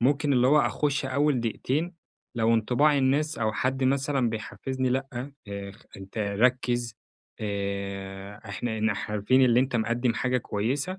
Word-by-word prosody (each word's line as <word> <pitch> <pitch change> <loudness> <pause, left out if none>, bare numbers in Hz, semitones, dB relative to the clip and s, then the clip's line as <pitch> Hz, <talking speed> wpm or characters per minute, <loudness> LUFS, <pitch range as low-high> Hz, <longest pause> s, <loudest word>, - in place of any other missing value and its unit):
ممكن 140 +3 +2
اللي 125 -1 +4
هو 150 +3 +5
أخُش 145 -3 0
أوّل 140 0 +1
دقيقتين، 145 - -1 0.4
لو 115 0 +3
انطباع 135 +6 +3
الناس 145 +4 +1
أو 110 -1 0
حد 130 +4 0
مثلًا 135 -2 +1
بيحفزني 130 +4 -3
لأ، 135 +2 -1 0.4
آآ 100 0 -5
خ 105 - -19
أنتَ 95 +3 -9
ركّز، 120 +3 +1 0.5
آآ، 100 -1 -4
إحنا 110 +2 -3
نح 110 0 -1
عارفين 105 +5 +3
إن 120 -2 +5
أنتَ 130 -1 +2
مقدم 120 +2 +1
حاجة 125 0 +1
كويّسة، 135 - -2
120 Hz, 150 wpm, -27 LUFS, 105-135 Hz, 0.5 s, هو